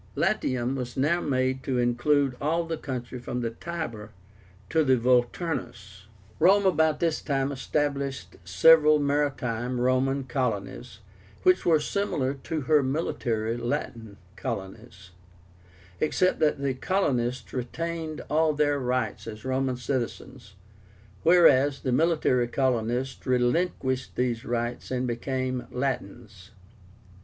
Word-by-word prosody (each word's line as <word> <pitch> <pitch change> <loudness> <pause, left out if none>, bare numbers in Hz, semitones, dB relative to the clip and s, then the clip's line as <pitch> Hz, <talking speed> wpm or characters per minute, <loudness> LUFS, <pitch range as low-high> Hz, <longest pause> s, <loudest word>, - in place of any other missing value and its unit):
LATIUM 130 0 0
was 125 -2 -5
now 155 +6 +2
made 130 -1 0
to 130 -1 -2
include 125 +3 +2
all 165 +4 0
the 165 0 -3
country 125 -4 -6
from 125 0 -4
the 115 -1 -2
Tiber 115 -7 -6 0.6
to 160 0 +3
the 130 -3 +3
Volturnus. 120 - -1 0.3
Rome 195 +5 +5
about 160 -5 +3
this 165 -2 0
time 135 -1 -1
established 140 - -2
several 150 - +6
MARITIME 135 -4 -1
(Roman) 130 +2 +1
COLONIES, 105 - -3 0.4
which 185 0 +3
were 160 -2 +5
similar 150 -6 -1
to 150 +3 -4
her 150 +2 +3
MILITARY 120 -5 -1
(Latin) 120 -4 -4 0.2
COLONIES, 100 -4 -7 0.9
except 185 +4 +1
that 155 -1 +2
the 140 -1 -1
colonists 125 - -1
retained 160 +5 -4
all 155 0 +2
their 145 -1 +1
rights 125 -2 -2
as 110 0 -8
Roman 130 -1 -1
citizens, 125 -3 -5 0.7
whereas 145 -5 +5
the 130 - -1
military 140 -4 +2
colonists 125 +1 -1
relinquished 130 +1 0
these 120 -2 -1
rights 120 0 -3
and 130 0 -1
became 130 +1 -3
Latins. 110 -6 -5
130 Hz, 115 wpm, -26 LUFS, 120-150 Hz, 0.9 s, several